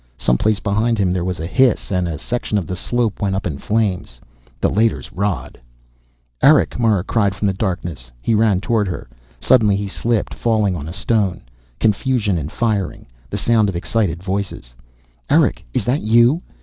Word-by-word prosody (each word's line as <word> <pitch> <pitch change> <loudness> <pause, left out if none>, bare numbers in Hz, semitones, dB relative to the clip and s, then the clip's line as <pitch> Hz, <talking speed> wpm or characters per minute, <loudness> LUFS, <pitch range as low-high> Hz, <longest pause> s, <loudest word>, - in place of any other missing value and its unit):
Someplace 100 - +1
behind 110 +3 0
him 95 -3 +1
there 90 -1 -1
was 90 -1 -3
a 80 - -4
hiss, 120 +7 +2
and 90 -2 0
a 80 -3 -4
section 110 +6 -2
of 95 - -1
the 90 - -4
slope 115 +2 -1
went 100 -2 0
up 95 - -3
in 70 - -3
flames. 100 - -1 0.4
The - - +2
Leiter's 110 +1 0
rod 100 0 -3 0.8
"Erick," 145 -4 +4
Mara 110 -6 +2
cried 100 -3 +1
from 100 - -3
the 100 - +2
darkness. 85 - -4
He 115 - 0
ran 105 -4 +3
toward 105 -1 +1
her. 90 - -5 0.3
Suddenly 110 -5 +4
he 100 0 -2
slipped, 115 +2 -1
falling 110 -5 +1
on 80 -1 -6
a - - -6
stone. 100 -1 0 0.4
Confusion 105 -3 +1
and 75 +1 -5
firing. 110 -5 -1 0.2
The 100 - -3
sound 110 0 +2
of 95 - -4
excited 90 -1 -1
voices. 95 -11 -4 0.6
"Erick, - - +3
is - - -1
that 125 +5 +1
you?" 120 +8 +4
100 Hz, 175 wpm, -19 LUFS, 90-115 Hz, 0.8 s, Erick